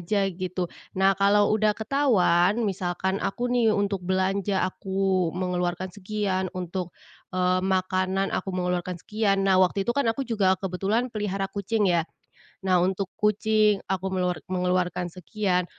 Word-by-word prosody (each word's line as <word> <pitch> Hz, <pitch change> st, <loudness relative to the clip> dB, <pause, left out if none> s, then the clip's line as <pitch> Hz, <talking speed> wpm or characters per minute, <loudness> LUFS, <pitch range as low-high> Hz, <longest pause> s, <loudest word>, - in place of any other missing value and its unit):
aja 195 Hz, +3 st, 0 dB
gitu. 180 Hz, 0 st, -4 dB, 0.2 s
Nah 190 Hz, +1 st, +4 dB
kalau 205 Hz, +1 st, +4 dB
udah 215 Hz, -1 st, +2 dB
ketahuan, 220 Hz, -5 st, +2 dB
misalkan 190 Hz, 0 st, -1 dB
aku 240 Hz, +5 st, -2 dB
nih 240 Hz, -2 st, +3 dB
untuk 200 Hz, -1 st, 0 dB
belanja 190 Hz, +2 st, 0 dB
aku 190 Hz, -2 st, 0 dB
mengeluarkan 180 Hz, 0 st, -2 dB
sekian, 195 Hz, -2 st, -2 dB
untuk, 180 Hz, 0 st, -4 dB, 0.4 s
eee, 185 Hz, 0 st, +2 dB
makanan 190 Hz, 0 st, 0 dB
aku -, -, -2 dB
mengeluarkan 180 Hz, 0 st, -1 dB
sekian, 200 Hz, +1 st, 0 dB
nah 190 Hz, -1 st, +4 dB
waktu 190 Hz, +2 st, +2 dB
itu 240 Hz, -, +1 dB
kan 280 Hz, -3 st, 0 dB
aku 225 Hz, +5 st, 0 dB
juga 200 Hz, -5 st, +2 dB
kebetulan 200 Hz, +7 st, -1 dB
pelihara 200 Hz, -2 st, -2 dB
kucing 205 Hz, +2 st, 0 dB
ya. 170 Hz, -3 st, +2 dB, 0.6 s
Nah, 185 Hz, -1 st, +4 dB
untuk 190 Hz, +1 st, 0 dB
kucing, 210 Hz, -1 st, +2 dB
aku 190 Hz, -1 st, -1 dB
meluar 180 Hz, -2 st, 0 dB
mengeluarkan 180 Hz, -1 st, 0 dB
sekian. 180 Hz, 0 st, -1 dB
190 Hz, 140 wpm, -26 LUFS, 180-205 Hz, 0.6 s, Nah